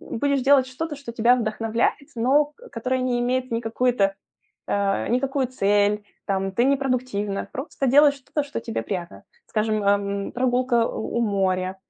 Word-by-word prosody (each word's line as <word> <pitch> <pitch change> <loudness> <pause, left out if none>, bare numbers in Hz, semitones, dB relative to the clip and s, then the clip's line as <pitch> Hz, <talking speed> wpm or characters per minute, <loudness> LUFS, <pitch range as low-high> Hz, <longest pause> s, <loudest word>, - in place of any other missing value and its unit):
будешь 280 +3 -1
делать 270 -1 +5
что-то, 295 +4 -5
что 275 -4 -8
тебя 235 +2 +4
вдохновляет, 225 +4 -1
но 270 +6 +3
к 460 +12 -17
которое 255 +3 -1
не 250 -1 0
имеет 255 +1 -1
никакую-то, 230 -3 +1 0.5
э, 200 -1 0
никакую 265 +1 0
цель, 205 -3 +1 0.2
там, 195 -1 -1
ты 240 +5 +2
не 275 +1 +4
продуктивна, 250 -7 -2
просто 270 0 -3
делаешь 285 +2 +6
что-то, 280 +2 -3
что 285 - -5
тебе 230 -1 -4
приятно. 170 - -6 0.2
Скажем, 215 -1 0
а, 200 0 +4
м, 200 0 -3
прогулка 250 -1 +1
у 220 - -4
у - - +1
моря 190 -3 0
240 Hz, 160 wpm, -24 LUFS, 205-260 Hz, 0.5 s, делаешь